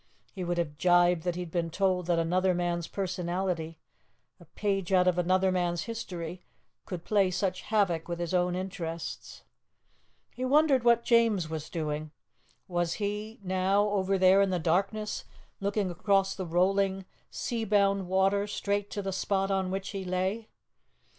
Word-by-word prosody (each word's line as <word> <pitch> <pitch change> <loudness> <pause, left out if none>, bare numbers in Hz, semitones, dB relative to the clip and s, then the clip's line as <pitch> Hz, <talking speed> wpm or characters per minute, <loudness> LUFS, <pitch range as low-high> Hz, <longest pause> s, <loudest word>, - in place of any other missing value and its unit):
He 190 - -5
would 175 0 -2
have 150 -3 -2
gibed 175 -1 +4
had 175 -1 0
he 180 0 -4
been 165 0 -2
told 185 0 0
that 175 -1 +2
another 180 +3 +2
man's 175 -1 -1
personality, 180 -3 -3 0.6
a 175 - -15
page 195 +2 -2
out 185 -1 +4
of 180 -1 +2
another 185 +2 +2
man's 175 -2 0
history, 180 -7 -6 0.5
could 175 -3 -6
play 200 -3 +3
such 185 0 -1
havoc 195 -7 0
with 170 -1 -3
his 175 0 -3
own 180 0 +2
interests. 175 -3 -6 0.9
He 255 - -5
wondered 275 -1 +4
what 235 -1 +4
James 225 -8 +3
was 155 -1 -5
doing. 155 -2 -3 0.6
Was 175 -2 0
he 210 +2 -4
now 190 +2 +2
over 195 -1 +1
there 190 +1 +6
in 200 - +3
the 185 - 0
darkness, 195 +6 -1 0.4
looking 200 -1 -1
across 195 +2 +1
the 185 -2 -5
rolling, 190 +2 +1 0.2
sea 230 -2 -3
bound 200 -2 +2
water 195 +2 +2
straight 205 0 -2
to 205 - -4
the 195 0 -3
spot 195 +1 0
on 190 -1 0
which 195 +1 -3
he 195 -2 -4
lay? 190 +4 -2
185 Hz, 160 wpm, -29 LUFS, 175-200 Hz, 0.9 s, there